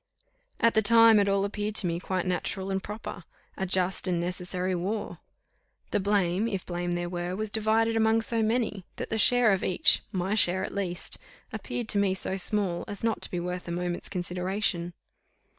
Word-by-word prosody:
At 230 -1 +4
the 220 - +4
time 230 0 +7
it 200 - +2
all 195 0 +2
appeared 210 +1 -3
to 200 - +4
me 170 -1 -1
quite 185 0 -2
natural 190 +1 -2
and 190 0 -1
proper; 205 -3 -7 0.3
a 190 - -3
just 185 +1 +1
and 175 -2 0
necessary 180 +1 -2
war. 195 +5 -3 0.7
The - - +2
blame, 200 0 +1
if 195 -5 -3
blame 175 0 -3
there 175 0 -2
were, 175 +1 -3
was 215 +1 -3
divided 225 +1 +2
among 225 0 +3
so 230 0 0
many, 220 -3 0
that - - -6
the 220 - 0
share 245 -1 +5
of 195 - 0
each, 185 - +4
my 190 0 -1
share 190 -3 +3
at - - -8
least, 185 -3 -3 0.3
appeared 240 -2 -4
to 205 - +3
me 195 -2 +2
so 190 - -2
small, 195 -2 0
as 205 - -7
not 225 -1 0
to - - -2
be 180 - -3
worth 180 +1 -4
a - - -4
moment's 175 0 -3
consideration. 180 -1 -2
190 Hz, 190 wpm, -28 LUFS, 180-215 Hz, 0.7 s, time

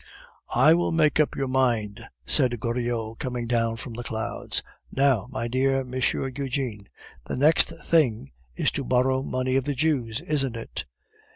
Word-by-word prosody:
"I 135 +6 +7
will 175 +1 +1
make 155 -2 +3
up 150 - +2
your 135 - -1
mind," 120 -6 0 0.2
said 120 - +2
Goriot, 115 -1 -2
coming 125 -2 -3
down 115 -1 0
from 120 +1 -8
the 120 +2 -6
clouds. 110 -1 -3 0.3
"Now, 135 -6 +2
my 125 -3 -3
dear 135 +2 +1
M. 125 -1 -9
Eugene, 130 -4 -2 0.4
the - - -3
next 150 +5 +4
thing 120 - +2 0.2
is - - +1
to 140 - -3
borrow 130 +1 +2
money 130 -1 -1
of 135 - 0
the 145 -1 -1
Jews, 130 -6 0
isn't 135 -5 -1
it?" 115 - -6
130 Hz, 160 wpm, -25 LUFS, 115-135 Hz, 0.4 s, I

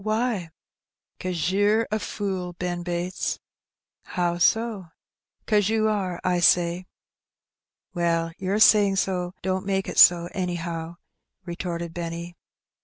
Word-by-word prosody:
Why?" 215 -4 -1 0.7
'Cause 180 -1 -2
yer 205 +3 +2
a 215 - 0
fool, 190 -4 -4
Ben 175 0 -4
Bates." 175 +1 -3 0.6
"How 175 -1 -2
so?" 220 -2 +1 0.6
'"Cause 210 -2 +2
ye 225 - +1
are, 205 -5 0
I 180 -1 +1
say." 175 +1 +3 1.1
"Well, 165 -1 0
your 190 +2 -1
saying 205 -2 +5
so 180 -2 -1
don't 190 0 -1
make 195 -1 -1
it - - -1
so, 175 -1 +7
anyhow,'* 170 -3 -4 0.5
retorted 170 -1 -5
Benny. 170 0 -6
180 Hz, 115 wpm, -25 LUFS, 175-200 Hz, 1.1 s, so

